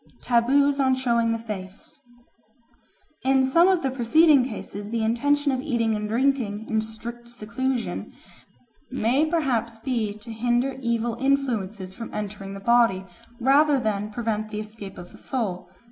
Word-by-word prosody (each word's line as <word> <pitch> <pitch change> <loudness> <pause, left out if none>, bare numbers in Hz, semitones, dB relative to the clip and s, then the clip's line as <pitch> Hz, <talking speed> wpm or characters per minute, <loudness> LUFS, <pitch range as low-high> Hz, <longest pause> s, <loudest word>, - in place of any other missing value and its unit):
Taboos 275 +4 +3
on 260 -1 +3
Showing 235 -3 +1
the 230 - 0
Face 205 -4 -8 1.3
IN 265 0 +3
SOME 335 +7 +5
of 370 -4 +2
the 265 - 0
preceding 275 +3 +5
cases 205 -3 -7
the 230 0 -1
intention 285 +6 +2
of 260 -1 -1
eating 235 -6 0
and 210 0 -3
drinking 230 -3 0
in 220 -1 +1
strict 235 +2 -8
seclusion 240 +2 -3 0.8
may 260 +4 +1
perhaps 250 -9 0
be 225 -3 -1
to 215 +2 -9
hinder 240 +4 0
evil 235 -1 0
influences 225 -9 -1
from 230 +3 -8
entering 200 -1 -5
the - - -7
body 230 -3 +3 0.3
rather 280 +3 +4
than 210 -3 -1
to - - -12
prevent 215 -2 -2
the 210 0 -4
escape 210 -2 -8
of 175 0 -10
the - - -15
soul. 185 -8 -3
235 Hz, 150 wpm, -25 LUFS, 215-265 Hz, 1.3 s, SOME